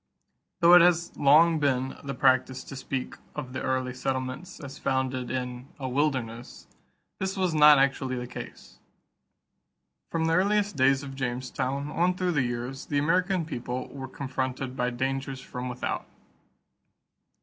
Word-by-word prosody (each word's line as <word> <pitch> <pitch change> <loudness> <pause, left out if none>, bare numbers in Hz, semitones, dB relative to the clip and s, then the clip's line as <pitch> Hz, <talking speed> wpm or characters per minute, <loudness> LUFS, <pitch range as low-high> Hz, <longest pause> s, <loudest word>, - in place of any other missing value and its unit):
Though 170 +1 +7
it 180 - +10
has 170 -1 +3
long 160 +3 +5
been 135 -2 0
the 140 -1 -4
practice 130 0 +2
to - - -9
speak 135 -1 -4 0.2
of 130 -4 -6
the - - -3
early 130 -1 -1
settlements 130 +5 -4
as 135 -1 -9
founded 130 -2 -1
in 125 0 -4
"a 130 - -4
wilderness," 125 -4 -2 0.5
this 190 +1 -2
was 185 -3 +1
not 150 -1 +8
actually 135 -1 +1
the 125 0 -4
case. - - -10 1.3
From 165 -1 0
the 165 - +2
earliest 200 +2 +2
days 135 0 +3
of 135 -1 -7
Jamestown 135 +2 -3
on 180 +2 +1
through 180 -1 0
the 145 -5 +2
years, 120 +2 -4
the 145 - -1
American 180 +4 +1
people 125 -4 -4
were 135 -1 -7
confronted 130 -1 -4
by 125 -1 0
dangers 135 +2 -3
from 125 -1 -6
without. 125 - -3
135 Hz, 150 wpm, -27 LUFS, 130-155 Hz, 1.3 s, it